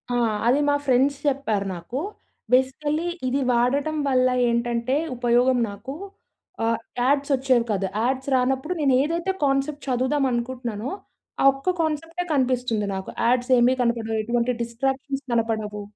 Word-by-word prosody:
ఆ! - - +2 0.3
అది 265 +4 +4
మా 285 - +3
ఫ్రెండ్స్ 265 +2 +3
చెప్పారు 225 -8 0
నాకు. 175 +10 -5 0.5
బేసికల్లీ 295 +5 +1 0.2
ఇది 270 +2 0
వాడటం 275 +6 +1
వల్ల 255 -1 +3 0.2
ఏంటంటే 235 +2 0 0.2
ఉపయోగం 245 +1 +3
నాకు 205 +7 -7 0.7
ఆహ్, 230 0 +1 0.2
యాడ్స్ 280 +3 +2
వచ్చేవి 255 -3 +2
కాదు. 195 -1 0 0.2
యాడ్స్ 260 +2 -1
రానప్పుడు 265 +6 0
నేను 275 -3 +3
ఏదైతే 335 +5 -1
కాన్సెప్ట్ 280 +1 0
చదువుదాం 260 +3 +1
అనుకుంటున్నానో. 240 -1 -3 0.5
ఆ - - +3
ఒక్క 275 +7 -1
కాన్సెప్టే 330 +3 -2
కనిపిస్తుంది 250 -5 0
నాకు. 190 - -5 0.2
యాడ్స్ 245 +2 +2
ఏమీ 250 +2 +4
కనపడవు. 230 -2 0
ఎటువంటి 235 +2 0
డిస్ట్రాక్షన్స్ 270 +4 -3
కనపడవు. 220 -2 -1
255 Hz, 130 wpm, -24 LUFS, 235-275 Hz, 0.7 s, అది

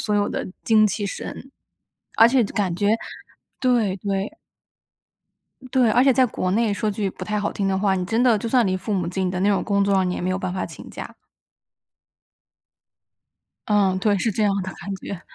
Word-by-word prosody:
所 210 - 0
有 205 0 +2
的 - - -3 0.2
精 215 -1 +4
气 205 +1 -2
神。 225 +6 -6 0.7
而 225 - +9
且 255 +1 +3
感 200 -4 -1
觉 200 +3 0 0.7
对 240 -7 +2
对。 200 - -3 1.4
对， 250 -4 +4
而 250 +4 +4
且 270 - +5
在 260 +1 +4
国 185 -4 -2
内， 220 0 +2
说 210 +2 -1
句 200 -1 -2
不 - - -8
太 210 0 -2
好 205 - -1
听 200 - -2
的 190 0 +1
话， 195 -1 +1
你 185 - -2
真 225 +6 0
的 235 -4 +4
就 230 - -4
算 245 0 +3
离 185 0 0
父 210 +3 -4
母 180 -3 -1
近 185 +1 -1
的 180 0 -3
那 200 - +2
种 200 -2 +2
工 200 -1 +1
作 200 - +1
啊， 190 -1 +3
你 180 - -1
也 - - -4
没 180 - -1
有 185 - -1
办 180 - -3
法 185 - -2
请 - - -10
假。 - - -8 2.6
嗯， 200 -3 +2
对， 205 +1 +2
是 220 +3 0
这 215 - -1
样 205 - +3
的 190 0 -5
感 200 -1 -6
觉。 190 -1 -7
205 Hz, 225 characters per minute, -22 LUFS, 190-220 Hz, 2.6 s, 而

